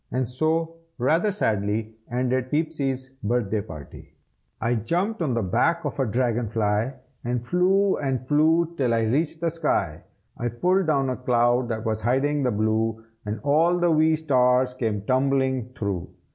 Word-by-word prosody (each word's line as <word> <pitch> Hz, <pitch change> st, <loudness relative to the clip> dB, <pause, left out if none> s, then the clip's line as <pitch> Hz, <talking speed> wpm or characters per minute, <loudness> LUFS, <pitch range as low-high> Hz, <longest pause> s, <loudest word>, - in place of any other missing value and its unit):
And 130 Hz, -1 st, -1 dB
so, 160 Hz, +6 st, -1 dB, 0.2 s
rather 160 Hz, -, +2 dB
sadly, 110 Hz, -, -1 dB, 0.2 s
ended 125 Hz, +1 st, 0 dB
Peepsy's 140 Hz, -4 st, -1 dB
birthday 110 Hz, -1 st, 0 dB
party. 75 Hz, -8 st, -11 dB, 0.4 s
I 115 Hz, -, 0 dB
jumped 175 Hz, -, -1 dB
on 135 Hz, -7 st, 0 dB
the 115 Hz, -, 0 dB
back 165 Hz, -, +1 dB
of 145 Hz, -, -4 dB
a 135 Hz, -, +1 dB
dragon 120 Hz, 0 st, 0 dB
fly, 110 Hz, +3 st, 0 dB, 0.3 s
And 120 Hz, 0 st, -2 dB
flew 190 Hz, +6 st, +2 dB
and 130 Hz, -3 st, -2 dB
flew 160 Hz, +3 st, +3 dB
till 125 Hz, -4 st, +1 dB
I 115 Hz, -, +1 dB
reached 150 Hz, +8 st, 0 dB
the 165 Hz, -1 st, 0 dB
sky. 120 Hz, -, -1 dB, 0.3 s
I 120 Hz, -, -3 dB
pulled 180 Hz, -, +1 dB
down 135 Hz, -4 st, +1 dB
a 125 Hz, -, -3 dB
cloud 120 Hz, 0 st, +2 dB
that 110 Hz, 0 st, -3 dB
was 110 Hz, -1 st, -1 dB
hiding 135 Hz, +5 st, +1 dB
the 130 Hz, -, +1 dB
blue, 110 Hz, +1 st, 0 dB, 0.2 s
And 105 Hz, +1 st, -3 dB
all 165 Hz, +5 st, +3 dB
the 175 Hz, -1 st, +2 dB
wee 160 Hz, 0 st, +4 dB
stars 125 Hz, -4 st, +2 dB
came 110 Hz, -5 st, -2 dB
tumbling 130 Hz, 0 st, +1 dB
through. 95 Hz, -5 st, -3 dB
130 Hz, 160 wpm, -24 LUFS, 115-155 Hz, 0.4 s, wee